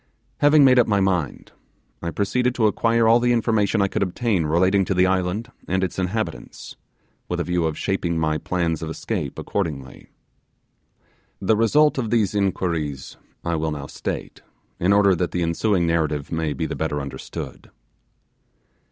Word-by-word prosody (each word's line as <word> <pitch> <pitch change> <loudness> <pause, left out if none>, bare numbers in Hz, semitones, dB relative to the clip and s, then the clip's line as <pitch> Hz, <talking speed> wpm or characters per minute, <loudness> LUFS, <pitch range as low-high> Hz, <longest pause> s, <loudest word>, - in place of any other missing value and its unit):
Having 145 0 +6
made 130 -1 +6
up 120 - +4
my 100 -2 +2
mind, 90 -7 -1 0.5
I 85 - -3
proceeded 125 +7 0
to 115 - +2
acquire 115 +2 +2
all 115 +2 +6
the 120 0 +2
information 110 -3 +2
I - - +2
could - - -3
obtain 95 -3 0
relating 95 +5 +3
to 95 - -1
the 90 +1 +4
island 95 +5 -1 0.2
and 95 +1 0
its 95 0 -3
inhabitants, 100 +4 -4 0.5
with - - -2
a - - 0
view 90 -1 0
of 80 -1 -2
shaping 90 -4 -1
my 80 -1 0
plans 85 -1 -1
of 80 - -4
escape 80 - -4
accordingly. 75 -9 -4 1.3
The 105 +3 +2
result 140 +7 +3
of 115 -4 -2
these 110 -4 +1
inquiries 85 -8 -2 0.3
I 85 - -1
will 80 0 -1
now 75 -2 -5
state, - - -6 0.4
in 90 +3 +2
order 100 -1 +5
that 90 0 -1
the 90 - 0
ensuing 85 +2 +1
narrative 80 -4 -1
may 80 -2 -1
be - - -3
the - - -4
better 80 -2 -2
understood. 70 -2 -7
95 Hz, 165 wpm, -22 LUFS, 80-110 Hz, 1.3 s, Having